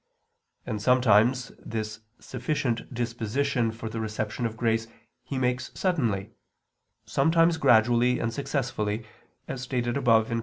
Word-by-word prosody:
And 105 Hz, -, -3 dB
sometimes 125 Hz, +1 st, +4 dB
this 110 Hz, -1 st, -5 dB, 0.2 s
sufficient 125 Hz, -2 st, -2 dB
disposition 120 Hz, +1 st, -1 dB
for 115 Hz, 0 st, -7 dB
the 115 Hz, +1 st, -4 dB
reception 110 Hz, +1 st, -2 dB
of 110 Hz, 0 st, -9 dB
grace 115 Hz, -1 st, +1 dB, 0.3 s
He 130 Hz, +2 st, -5 dB
makes 125 Hz, 0 st, 0 dB
suddenly, 115 Hz, -, 0 dB, 0.7 s
sometimes 165 Hz, 0 st, +3 dB
gradually 120 Hz, -1 st, +4 dB
and 115 Hz, 0 st, -2 dB
successively, 120 Hz, -6 st, -2 dB, 0.4 s
as 125 Hz, -, -5 dB
stated 125 Hz, -1 st, -1 dB
above 115 Hz, -4 st, +3 dB
(Q. 115 Hz, -1 st, 0 dB
120 Hz, 120 wpm, -27 LUFS, 110-130 Hz, 0.7 s, sometimes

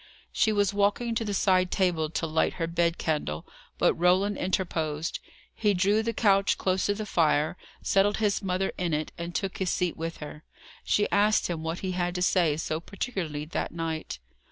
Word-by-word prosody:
She 220 Hz, -, +2 dB
was 205 Hz, -2 st, +2 dB
walking 205 Hz, +4 st, +1 dB
to 225 Hz, 0 st, -1 dB
the 210 Hz, -, -3 dB
side 185 Hz, -2 st, +3 dB
table 175 Hz, -6 st, +1 dB
to 165 Hz, -, -2 dB
light 160 Hz, 0 st, +1 dB
her 165 Hz, -, -2 dB
bed 170 Hz, 0 st, 0 dB
candle, 150 Hz, -, -2 dB, 0.3 s
but -, -, +3 dB
Roland 185 Hz, +4 st, +2 dB
interposed. 165 Hz, -4 st, -1 dB, 0.3 s
He 210 Hz, -2 st, +1 dB
drew 200 Hz, +4 st, +3 dB
the 230 Hz, +1 st, -1 dB
couch 200 Hz, -3 st, +3 dB
close 185 Hz, 0 st, 0 dB
to 205 Hz, -, +1 dB
the 215 Hz, +1 st, -4 dB
fire, 155 Hz, -4 st, +2 dB, 0.3 s
settled 200 Hz, +1 st, +3 dB
his 210 Hz, -2 st, +1 dB
mother 190 Hz, 0 st, -1 dB
in 175 Hz, -4 st, 0 dB
it, 155 Hz, 0 st, -3 dB
and 170 Hz, 0 st, -5 dB
took 195 Hz, -2 st, -2 dB
his 190 Hz, -2 st, 0 dB
seat 180 Hz, -1 st, 0 dB
with 165 Hz, +1 st, -5 dB
her. 150 Hz, +1 st, -9 dB, 0.4 s
She 210 Hz, -, +2 dB
asked 205 Hz, -2 st, +3 dB
him 165 Hz, -2 st, -3 dB
what 160 Hz, +2 st, -4 dB
he 190 Hz, -, -2 dB
had 175 Hz, 0 st, -1 dB
to 180 Hz, -, 0 dB
say 170 Hz, -5 st, +3 dB
so 155 Hz, 0 st, -2 dB
particularly 170 Hz, -, -4 dB
that 160 Hz, -, -3 dB
night. 165 Hz, -, -4 dB
180 Hz, 190 wpm, -27 LUFS, 165-200 Hz, 0.4 s, side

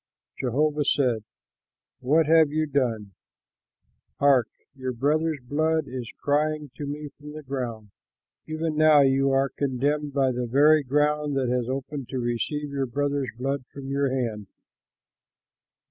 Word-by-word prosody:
Jehovah 145 Hz, +4 st, +1 dB
said, 125 Hz, -6 st, +1 dB, 0.8 s
"What 150 Hz, +5 st, +3 dB
have 160 Hz, -1 st, +5 dB
you 155 Hz, +1 st, 0 dB
done? 120 Hz, -8 st, -1 dB, 1.0 s
Hark! 135 Hz, -5 st, +4 dB, 0.3 s
your 130 Hz, -2 st, -4 dB
brother's 155 Hz, +5 st, +1 dB
blood 155 Hz, +4 st, 0 dB
is 125 Hz, -2 st, -6 dB
crying 150 Hz, 0 st, 0 dB
to 145 Hz, -, -5 dB
me 145 Hz, +1 st, -5 dB
from 150 Hz, +1 st, -12 dB
the 155 Hz, 0 st, -8 dB
ground. 120 Hz, -6 st, -5 dB, 0.6 s
Even 155 Hz, 0 st, -2 dB
now 155 Hz, -1 st, +6 dB
you 135 Hz, 0 st, +3 dB
are 135 Hz, 0 st, +2 dB
condemned 145 Hz, +3 st, -1 dB
by 135 Hz, -2 st, +2 dB
the 125 Hz, 0 st, -3 dB
very 150 Hz, +5 st, +5 dB
ground 150 Hz, +1 st, +1 dB
that 130 Hz, -2 st, 0 dB
has 125 Hz, -1 st, -1 dB
opened 135 Hz, 0 st, -4 dB
to 130 Hz, -, -3 dB
receive 130 Hz, +5 st, -2 dB
your 135 Hz, -1 st, -1 dB
brother's 140 Hz, +1 st, -1 dB
blood 135 Hz, +1 st, -2 dB
from 135 Hz, -1 st, -8 dB
your 140 Hz, 0 st, +1 dB
hand. 115 Hz, -6 st, -3 dB
140 Hz, 140 wpm, -25 LUFS, 130-150 Hz, 1.0 s, now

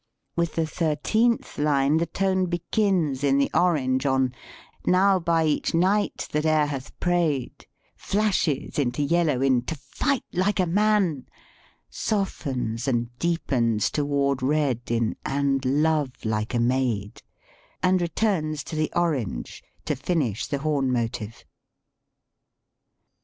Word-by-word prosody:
With 170 Hz, -1 st, -1 dB
the 165 Hz, -, +1 dB
thirteenth 175 Hz, +10 st, 0 dB
line 145 Hz, 0 st, +2 dB
the 165 Hz, +1 st, 0 dB
tone 190 Hz, -1 st, 0 dB
begins 175 Hz, -5 st, 0 dB
in 140 Hz, -1 st, +3 dB
the 140 Hz, -, +1 dB
orange 140 Hz, -6 st, +2 dB
on, 130 Hz, -1 st, +1 dB, 0.3 s
" -, -, -25 dB
Now 190 Hz, +1 st, +4 dB
by 165 Hz, -1 st, +1 dB
each 155 Hz, +1 st, 0 dB
knight 195 Hz, +5 st, +1 dB
that 150 Hz, 0 st, 0 dB
e'er 155 Hz, -1 st, +3 dB
hath 140 Hz, -3 st, -6 dB
prayed," 170 Hz, -7 st, -1 dB, 0.3 s
flashes 195 Hz, -10 st, 0 dB
into 135 Hz, +1 st, 0 dB
yellow 160 Hz, -4 st, +1 dB
in 130 Hz, -3 st, +3 dB
"to 160 Hz, -, -3 dB
fight 250 Hz, -, -2 dB
like 195 Hz, +3 st, +1 dB
a 185 Hz, -, +3 dB
man," 190 Hz, -6 st, +1 dB, 0.6 s
softens 130 Hz, -, -2 dB
and 120 Hz, -2 st, -1 dB
deepens 115 Hz, -11 st, 0 dB
toward 140 Hz, -2 st, 0 dB
red 135 Hz, -3 st, +1 dB
in 115 Hz, -1 st, 0 dB
"and 135 Hz, -1 st, 0 dB
love 145 Hz, -1 st, 0 dB
like 110 Hz, +2 st, -1 dB
a -, -, +2 dB
maid," 120 Hz, -4 st, 0 dB, 0.6 s
and 185 Hz, 0 st, +3 dB
returns 170 Hz, -5 st, -1 dB
to 160 Hz, -, -7 dB
the 155 Hz, 0 st, -1 dB
orange 135 Hz, -, -2 dB, 0.2 s
to -, -, 0 dB
finish 135 Hz, -, -1 dB
the 140 Hz, -, -1 dB
horn 140 Hz, -4 st, +1 dB
motive. 115 Hz, -2 st, -3 dB
150 Hz, 130 wpm, -25 LUFS, 130-175 Hz, 0.6 s, Now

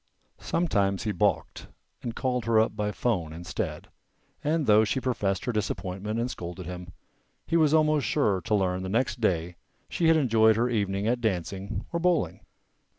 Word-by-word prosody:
Sometimes 100 Hz, -, 0 dB
he 110 Hz, -, -1 dB
balked 90 Hz, -, -1 dB, 0.3 s
and 115 Hz, -2 st, -5 dB
called 125 Hz, -3 st, -1 dB
her 115 Hz, -1 st, +4 dB
up 110 Hz, -, +1 dB
by 105 Hz, -1 st, -1 dB
'phone 90 Hz, -10 st, -1 dB
instead, 85 Hz, +1 st, -5 dB, 0.6 s
and 155 Hz, 0 st, +1 dB
though 105 Hz, -1 st, +6 dB
she 110 Hz, +5 st, 0 dB
professed 110 Hz, -7 st, -1 dB
her 125 Hz, -, 0 dB
disappointment 105 Hz, 0 st, -3 dB
and 120 Hz, +2 st, -1 dB
scolded 90 Hz, +1 st, -7 dB
him, 90 Hz, 0 st, -7 dB, 0.5 s
he -, -, -1 dB
was 155 Hz, -3 st, +4 dB
almost 155 Hz, -2 st, +3 dB
sure 105 Hz, -11 st, +1 dB
to 105 Hz, -, 0 dB
learn 95 Hz, -2 st, 0 dB
the 95 Hz, -, -4 dB
next 120 Hz, +3 st, 0 dB
day 85 Hz, -4 st, 0 dB, 0.3 s
she 170 Hz, -, +1 dB
had 165 Hz, 0 st, +6 dB
enjoyed 110 Hz, -6 st, +4 dB
her 120 Hz, +3 st, +1 dB
evening 100 Hz, -3 st, -1 dB
at 120 Hz, +2 st, +1 dB
dancing 95 Hz, 0 st, -2 dB
or 170 Hz, -, 0 dB
bowling. 175 Hz, -1 st, +1 dB
110 Hz, 170 wpm, -27 LUFS, 95-125 Hz, 0.6 s, though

